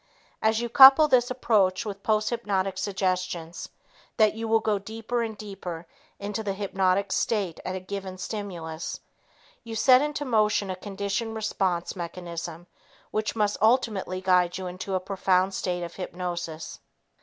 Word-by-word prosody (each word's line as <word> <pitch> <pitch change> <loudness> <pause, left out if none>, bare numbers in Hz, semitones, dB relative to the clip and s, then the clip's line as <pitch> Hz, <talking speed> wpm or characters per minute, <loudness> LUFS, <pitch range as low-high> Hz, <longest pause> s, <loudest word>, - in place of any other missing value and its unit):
As 220 +1 +2
you 240 - -1
couple 270 +5 +9
this 245 -4 +3
approach 210 -7 +2
with 200 -2 -6
posthypnotic 210 -3 0
suggestions 185 -4 -2 0.5
that 215 -2 +5
you 225 +1 -4
will 225 0 +4
go 215 -2 0
deeper 225 +4 -3
and 220 -2 -4
deeper 185 -5 -7 0.3
into 205 +2 -4
the 200 -2 -2
hypnotic 195 0 0
state 200 -7 0
at 185 - -3
a - - -3
given 190 0 -6
stimulus, 175 -6 -5 0.6
you 230 -1 -7
set 255 +3 +6
into 295 0 -2
motion 210 -5 +2
a - - -3
conditioned 200 +3 -3
response 190 -5 -1
mechanism 170 -1 -6 0.5
which 215 0 -1
must 210 -2 +1
ultimately 215 -5 +2
guide 180 -2 +3
you 190 - -5
into 185 +2 -4
a - - +2
profound 190 0 +1
state 180 -2 -2
of 170 0 -6
hypnosis. 175 -3 -5
195 Hz, 145 wpm, -26 LUFS, 185-220 Hz, 0.6 s, couple